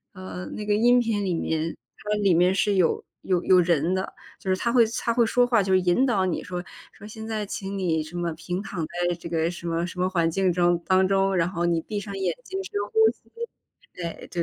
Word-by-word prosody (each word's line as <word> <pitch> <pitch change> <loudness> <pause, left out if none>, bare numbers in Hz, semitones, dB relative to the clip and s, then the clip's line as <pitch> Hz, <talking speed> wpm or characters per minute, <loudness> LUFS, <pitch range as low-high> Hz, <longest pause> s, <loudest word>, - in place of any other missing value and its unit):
呃， 185 -1 -7
那 210 - -6
个 210 - +2
音 240 +4 +5
频 225 -4 0
里 185 -2 0
面， 160 0 -2 0.2
它 210 - -7
里 200 -4 +3
面 180 +2 +4
是 200 +2 +2
有 180 -4 +2 0.2
有 180 -2 +1
有 185 -1 +6
人 170 0 +2
的。 190 0 -2 0.3
就 190 - -3
是 185 - +3
他 235 +5 -1
会 240 -2 +6
他 235 - 0
会 235 0 +4
说 245 +2 +3
话， 235 -4 +3
就 190 0 -1
是 185 - +5
引 180 +8 +3
导 205 -8 +2
你 180 - -2
说 180 -1 -5 0.3
说： 205 - -13
“现 220 +1 -8
在， 215 -2 -3
请 195 0 -5
你 165 -4 0
什 155 +3 -9
么， 175 -1 -1
平 175 +3 -4
躺 180 -6 -4
在 175 +1 -1
这 170 0 -9
个 165 -1 0
什 175 -1 -8
么 165 +1 0
什 180 +1 -7
么 185 - +2
环 170 -3 +1
境 185 +2 +1
中 175 0 +3
当 190 0 +3
中。 195 0 +2
然 170 -1 +2
后 175 -2 -2
你 170 -1 +2
闭 210 +3 -4
上 200 -1 -7
眼 185 -3 0
睛 380 +9 -5
深 - - -10 0.2
呼 445 - -1
吸。” - - -30 0.6
对， 170 -2 -4 0.2
对 175 - -1
185 Hz, 260 characters per minute, -25 LUFS, 175-205 Hz, 0.6 s, 有